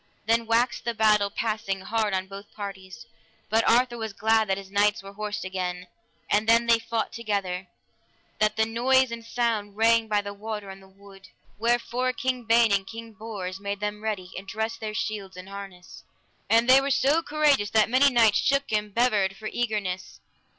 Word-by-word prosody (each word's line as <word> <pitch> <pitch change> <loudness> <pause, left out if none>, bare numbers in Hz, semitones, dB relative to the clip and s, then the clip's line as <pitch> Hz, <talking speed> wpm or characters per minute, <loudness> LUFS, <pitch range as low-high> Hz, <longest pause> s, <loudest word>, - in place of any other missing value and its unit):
Then 230 +1 +1
waxed 235 +2 +1
the 235 -1 -2
battle 210 -2 +3
passing 205 -2 -2
hard 215 +1 -1
on 190 0 -1
both 195 +1 -11
parties, 195 -3 -8 0.5
but 225 +1 +3
Arthur 240 0 +3
was 220 -2 -4
glad 220 0 +2
that 190 - +1
his 195 -1 -10
knights 205 0 +2
were 195 0 -10
horsed 210 -1 -4
again, 180 -1 -4 0.4
and 210 +2 +1
then 230 +1 +5
they 230 -1 +4
fought 230 0 -3
together, 200 -5 -3 0.7
that 215 0 +2
the 220 0 +2
noise 255 +3 +2
and 230 0 -6
sound 225 -4 -2
rang 225 0 +4
by 210 -1 +1
the 200 0 -7
water 210 -1 -6
and 190 0 -12
the 190 - -17
wood. 195 0 -16 0.3
Wherefore 240 +2 0
King 255 -2 -2
Ban 230 0 +4
and 195 -1 +1
King 230 +1 -9
Bors 200 -4 -6
made 200 0 -4
them 210 0 -4
ready, 200 -4 -4
and 195 - -8
dressed 225 +1 -3
their 215 -1 -5
shields 200 -4 -4
and 185 +1 -9
harness, 195 -3 -10 0.5
and 230 +1 +4
they 260 +1 +7
were 275 - -2
so 280 +4 +3
courageous 295 -9 +2
that 215 0 +3
many 260 +4 +4
knights 230 -5 +4
shook 275 -1 +1
and 210 -1 -1
bevered 210 -5 +2
for 215 0 -5
eagerness. 205 -6 -3
215 Hz, 185 wpm, -26 LUFS, 200-230 Hz, 0.7 s, they